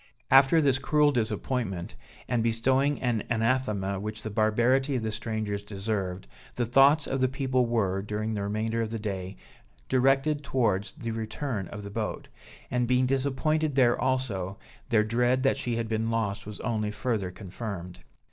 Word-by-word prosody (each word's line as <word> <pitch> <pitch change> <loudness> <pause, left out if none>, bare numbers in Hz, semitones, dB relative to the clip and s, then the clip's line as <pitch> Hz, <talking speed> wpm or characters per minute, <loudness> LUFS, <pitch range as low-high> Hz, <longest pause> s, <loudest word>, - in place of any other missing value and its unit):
After 135 +4 +7
this 135 -3 +3
cruel 150 +2 +3
disappointment, 110 -5 -2 0.3
and 120 -2 +1
bestowing 130 +5 +2
an 120 -4 +1
anathema 110 -5 0
which 105 +1 -5
the 110 - -4
barbarity 120 +6 +2
of 120 - -1
the 110 - -1
strangers 110 -2 -3
deserved, 100 - -3 0.3
the 120 - 0
thoughts 135 +5 +5
of 135 0 -2
the 130 - +4
people 130 -2 0
were, 100 -5 0
during 105 +2 -3
the 105 - -2
remainder 110 +3 -1
of 110 - -2
the 115 - -3
day, 95 -3 -4 0.5
directed 135 +3 +2
towards 115 -7 0
the 115 -1 -5
return 110 -1 -3
of 105 +1 -8
the 100 - -7
boat; 110 0 -4 0.4
and 125 -1 +1
being 125 +1 +3
disappointed 140 +3 0
there 125 -3 +4
also, 110 -8 -1 0.3
their 110 -3 +4
dread 120 +4 +1
that 135 -1 +3
she 125 -4 -2
had 115 -1 -2
been 110 0 -1
lost 115 -2 -2
was 105 - -7
only 110 -3 -1
further 105 -2 -2
confirmed. 90 -1 -7
115 Hz, 165 wpm, -28 LUFS, 105-130 Hz, 0.5 s, After